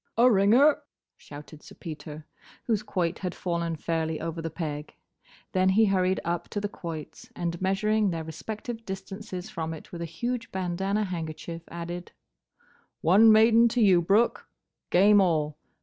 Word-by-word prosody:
"A 245 +2 +6
ringer!" 230 +9 +5 0.3
shouted 150 +1 -12
Sir - - -14
Peter, 155 -2 -8 0.4
whose 220 -4 0
quoit 180 -5 -2
had 180 -2 -4
fallen 170 -2 -2
fairly 160 0 -2
over 165 0 -4
the 165 - -3
peg. 150 -2 -5 0.6
Then 185 0 +3
he 215 +4 +5
hurried 190 -2 +1
up 170 +1 -2
to 205 - -3
the 205 - -2
quoits, 165 -6 -8
and, 170 0 -3
measuring 210 +2 +1
their 165 -2 -3
respective 220 +8 -6
distances 190 0 -7
from 160 -4 -4
it 155 - -13
with 170 - -7
a - - -2
huge 240 +8 -4
bandana 190 +3 -1
handkerchief, 165 -2 -5
added, 170 +1 -7 0.9
"One 210 +7 +6
maiden 225 +2 +6
to 235 +1 0
you, 185 -4 +5
Brooke! 205 +7 +2 0.4
Game 205 +3 +6
all! 155 -5 +1
185 Hz, 150 wpm, -27 LUFS, 165-210 Hz, 0.9 s, A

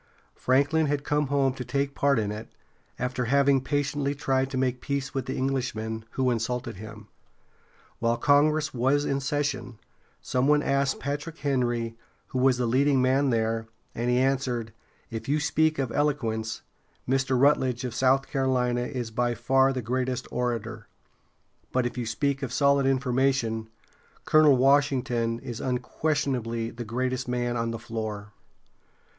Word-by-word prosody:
Franklin 145 +5 +2
had 145 0 -1
come 150 0 0
home 135 -1 +2
to 130 - -6
take 140 +1 -1
part 140 -1 +2
in 105 -2 0
it, 105 +2 -6 0.5
after 125 0 -2
having 140 +1 +3
patiently 145 0 -1
tried 135 -1 0
to 135 - -4
make 130 -1 0
peace 140 -1 -3
with 135 -2 -3
the - - -3
Englishmen, 110 -5 -2
who 130 -1 +1
insulted 120 -1 -2
him. 105 0 -10 0.9
While 115 0 +1
Congress 150 +4 +3
was 135 +4 +2
in 140 - 0
session, 135 -4 -2 0.4
some 130 +1 0
one 150 0 +4
asked 140 -1 +1
Patrick 145 +4 -4
Henry 120 -5 -1 0.3
who 130 - -2
was 130 -1 +4
the 125 - 0
leading 135 +3 +3
man 130 +2 +3
there, 115 -1 0 0.3
and 120 +1 -2
he 125 - +3
answered: 130 -4 0 0.4
"If 115 +2 -5
you 150 +2 +2
speak 155 +1 +1
of 135 -3 -1
eloquence, 115 -7 -1 0.4
Mr. 130 0 +1
Rut´ledge 130 -2 +3
of 125 -3 -3
South 130 +2 +2
Carolina 125 -3 0
is 125 -4 -4
by 120 +1 0
far 135 +4 +3
the 130 -2 -3
greatest 125 +2 -2
orator; 115 -3 -3 0.8
but 130 -1 +1
if 120 - -3
you 120 -2 -3
speak 140 +4 -1
of 135 -3 -3
solid 140 0 +3
information, 130 -4 +1 0.6
Colonel 155 -3 +6
Washington 125 -4 +2
is 120 -4 -6
unquestionably 125 -3 -1
the 120 +1 -7
greatest 130 +3 -2
man 120 -1 -1
on 115 -1 -1
the 115 - -3
floor!" 110 -3 -5
130 Hz, 150 wpm, -27 LUFS, 120-140 Hz, 0.9 s, Colonel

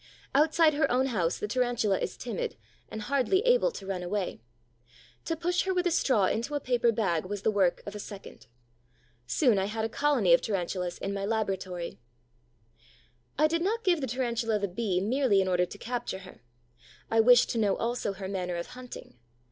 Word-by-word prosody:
Outside 310 +2 +4
her 295 0 +1
own 255 +2 +3
house 185 -10 0
the 210 - -3
Tarantula 240 -3 +1
is - - -4
timid 485 -1 -4 0.3
and 220 - -6
hardly 280 - +2
able - - +4
to 430 - -9
run 190 -2 -3
away. 180 - -3 0.8
To 330 - -1
push 350 +2 0
her 380 -1 0
with 360 0 +1
a 355 - +2
straw 255 - +3
into 235 +9 -1
a - - +1
paper 245 -3 +2
bag 190 -8 0
was 205 +1 -5
the 220 - +3
work 190 -4 +1
of 205 - -6
a 210 - -7
second. 200 -9 -10 0.8
Soon 230 - +3
I 190 - 0
had 220 +2 -2
a - - -2
colony 260 -9 +3
of 170 - +5
Tarantulas 180 -3 -2
in 195 - -4
my 200 0 -3
laboratory. 190 - -3 1.4
I 305 - +4
did 335 +2 +1
not 445 +6 0
give 350 -4 +2
the 265 - -2
Tarantula 235 -2 -1
the 200 -1 -1
Bee 190 -1 -1
merely 235 0 +2
in 190 - +1
order 180 -1 +2
to 205 - -10
capture 235 -4 -4
her. 185 - -14 0.7
I 225 - +3
wished 245 +2 +6
to 230 - -1
know 205 -3 +2
also 230 -3 -2
her 190 -1 -6
manner 180 -2 -3
of 170 0 -5
hunting. 250 - -10
220 Hz, 195 wpm, -29 LUFS, 195-270 Hz, 1.4 s, wished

